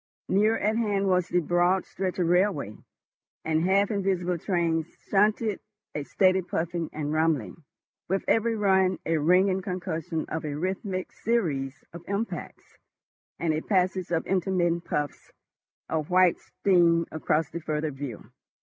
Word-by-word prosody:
Nearer 215 +4 +3
at 215 +2 0
hand 205 -4 +1
was 180 -1 +2
the 180 0 +1
broad 175 +3 +2
stretch 185 -1 -4
of 180 - +1
railway, 175 - +1 0.7
and 160 0 +1
half 195 +3 +3
invisible 185 -3 0
trains 165 -3 0 0.2
shunted—a 210 -4 0
steady 190 +3 +3
puffing 170 -1 -3
and 150 -1 -3
rumbling, 155 - 0 0.5
with 195 +1 0
every 230 0 +2
run 190 -3 +3
a 165 -1 +1
ringing 185 +4 +3
concussion 180 -4 -3
and 160 - -4
a 145 -1 -4
rhythmic 185 +2 -3
series 145 - -1
of 170 0 -9
impacts, 200 +3 -5 0.6
and 165 -2 0
a 155 - -1
passage 185 -1 0
of 165 -1 0
intermittent 175 -2 0
puffs 145 -1 -3 0.6
of 155 -2 -2
white 185 -1 +4
steam 170 -3 +2
across 155 0 0
the 170 - -5
further 155 0 -2
view. 135 -5 -7
180 Hz, 140 wpm, -27 LUFS, 160-195 Hz, 0.7 s, white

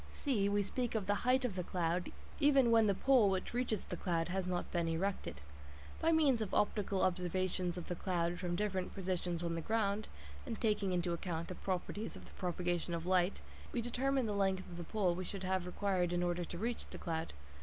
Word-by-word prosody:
(c) 215 -9 0
We 205 0 +2
speak 240 +4 -2
of 215 -3 0
the 205 - +2 0.2
height 260 0 +4
of 220 -7 -2
the 180 - -1
cloud 175 0 -1 0.3
even 275 -5 +5
when 225 -2 +6
the 200 - +3
pole 250 -3 +5
which 190 +3 -1
reaches 240 -4 0
the - - -4
cloud 170 -1 0
has 185 0 -1
not 180 -1 -2
been 170 -2 +1
erected. 165 - -2 0.6
By 330 - +4
means 290 -7 +4
of 205 -3 -2
optical 205 -2 +1
observations 180 0 0
of 175 - -5
the - - -1
cloud 175 -1 -1
from 175 -1 -1
different 190 -2 -1
positions 180 -2 -2
on 170 -1 -1
the 165 - -2
ground, 215 +1 0 0.4
and - - -5
taking 210 -4 +1
into 175 -1 0
account 170 -1 -3
the - - -3
properties 190 +4 -3
of - - -10
the - - -15
propagation 175 -1 -1
of 165 0 -4
light, 185 +1 +2 0.3
we - - -1
determine 255 +2 +1
the 210 - -1
length 195 -2 +1
of 170 - -7
the 175 - -4
pole 190 -1 +1
we 185 +2 -3
should 190 +1 -6
have 185 -1 0
required 180 -2 0
in 175 0 +1
order 175 0 0
to 170 - -6
reach 230 +5 -2
the - - -8
cloud. 165 -1 -3
185 Hz, 215 wpm, -36 LUFS, 175-210 Hz, 0.6 s, when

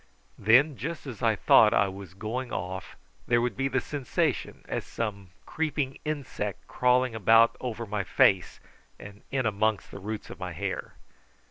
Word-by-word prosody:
Then, 130 +7 +5
just 165 +2 -5
as 125 -6 -8
I 115 -2 +3
thought 105 +2 +6
I 100 - +4
was 95 -2 -9
going 120 +5 -4
off 95 +1 -5 0.3
there 120 -1 +4
would 120 -3 -1
be 135 +5 0
the 135 0 +1
sensation 140 -1 -2
as - - -2
of - - -18
some 100 -4 -4 0.2
creeping 145 -4 -2
insect 140 -9 -4
crawling 125 0 +2
about 115 +2 +5
over 120 -2 -4
my 105 -1 -2
face 95 -1 +3 0.4
and 100 0 -12
in 130 -2 -1
amongst 105 0 0
the - - -8
roots 105 +2 -6
of - - -10
my - - -5
hair. - - -4
115 Hz, 165 wpm, -28 LUFS, 100-130 Hz, 0.4 s, thought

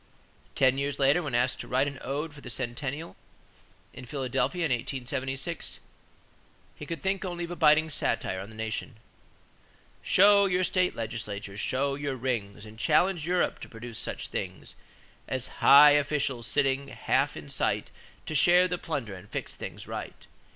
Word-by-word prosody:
Ten 130 0 +3
years 140 0 -2
later, 140 +5 +4
when 145 -7 -3
asked 125 +2 +1
to - - -6
write 130 +3 +2
an 140 -2 -6
ode 145 +4 -3
for 145 - -13
the 130 - -9
centennial 130 +6 -4 0.8
at 125 - -9
Philadelphia 135 +4 -1
in 150 - -1
1876, 135 +5 -3 1.0
he 150 - -9
could 165 +1 -4
think 195 0 -1
only 175 -2 -4
of 170 - -5
a - - -4
biting 155 -1 +5
satire 95 -9 0
on 100 - -9
the 110 - -13
nation: 110 +2 -4 1.0
"Show 200 +1 +6
your 185 0 +1
state 185 0 +1
legislatures; 105 -3 -5
show 135 +5 0
your 140 -1 -3
Rings; 110 -5 -3
And 110 +1 -12
challenge 175 +3 +2
Europe 180 0 +1
to - - -9
produce 115 0 -7
such - - -4
things - - -5 0.5
As 130 0 -2
high 145 +1 +9
officials 140 -4 0
sitting 140 -1 +1
half - - 0
in - - -9
sight - - -1 0.3
To - - -5
share 175 +4 +5
the 180 -1 -3
plunder 135 -10 -4
and 90 -1 -11
fix - - -5
things - - -8
right. - - -7
135 Hz, 165 wpm, -28 LUFS, 120-160 Hz, 1.0 s, high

